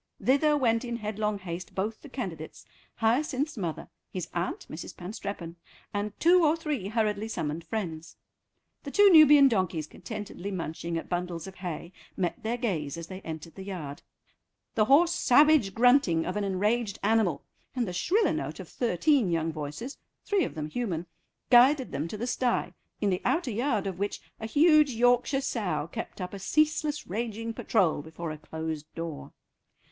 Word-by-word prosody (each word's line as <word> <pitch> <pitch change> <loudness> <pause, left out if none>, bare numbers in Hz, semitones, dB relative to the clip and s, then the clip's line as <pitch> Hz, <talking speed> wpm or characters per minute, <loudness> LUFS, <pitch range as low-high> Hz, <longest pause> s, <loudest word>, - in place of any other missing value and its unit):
Thither 295 +3 +3
went 230 -3 +2
in 240 -1 -3
headlong 215 -1 -2
haste 180 -2 -7
both 215 +3 -2
the 290 - -11
candidates, 180 - -6 0.3
Hyacinth's 275 +6 +1
mother, 175 -8 -4 0.2
his 185 -2 -4
aunt 175 +1 -3
(Mrs. 155 - -8
Panstreppon), 180 -2 -6 0.4
and 205 0 -3
two 350 +1 +5
or 305 0 +4
three 300 - -3
hurriedly 215 -1 0
summoned 160 -6 -3
friends. 170 -7 -5 0.6
The 285 - -7
two 405 +6 +6
Nubian 295 -4 +8
donkeys, 185 - 0
contentedly 205 +2 -7
munching 170 -2 -4
at - - -5
bundles 175 -2 -3
of 190 - -8
hay, 175 -1 -6 0.2
met 180 -2 -1
their 230 +2 -1
gaze 170 - -2
as 165 - -6
they 190 0 -7
entered 160 -1 -7
the 195 - -9
yard. 165 -8 -6 0.7
The 215 - +3
hoarse 330 +8 +5
savage 285 - +4
grunting 235 - +4
of 180 - -3
an 210 - -1
enraged 205 +2 0
animal 205 -8 +2 0.3
and 245 -3 0
the 180 - -4
shriller 370 - +2
note - - -4
of - - -7
thirteen 245 - +2
young 165 -1 0
voices, 155 - -6 0.3
three 405 -3 +2
of - - -7
them 155 -1 -3
human, 175 -3 -3 0.5
guided 260 +2 +6
them 145 +4 -2
to 210 - -6
the 230 - -3
stye, 250 0 0 0.3
in 205 -2 +2
the 180 - -1
outer 325 -7 +1
yard 225 -2 0
of 190 -2 -4
which 200 +1 -2 0.2
a 220 - -4
huge 300 +2 +5
Yorkshire 245 +3 +3
sow 180 - -1
kept - - -6
up 180 0 -5
a 200 - -6
ceaseless 300 +6 +1
raging 225 +2 -3
patrol 190 -10 +1
before 160 +2 -6
a 155 - -7
closed 160 0 -5
door. 165 -3 -6
210 Hz, 170 wpm, -28 LUFS, 170-250 Hz, 0.7 s, Nubian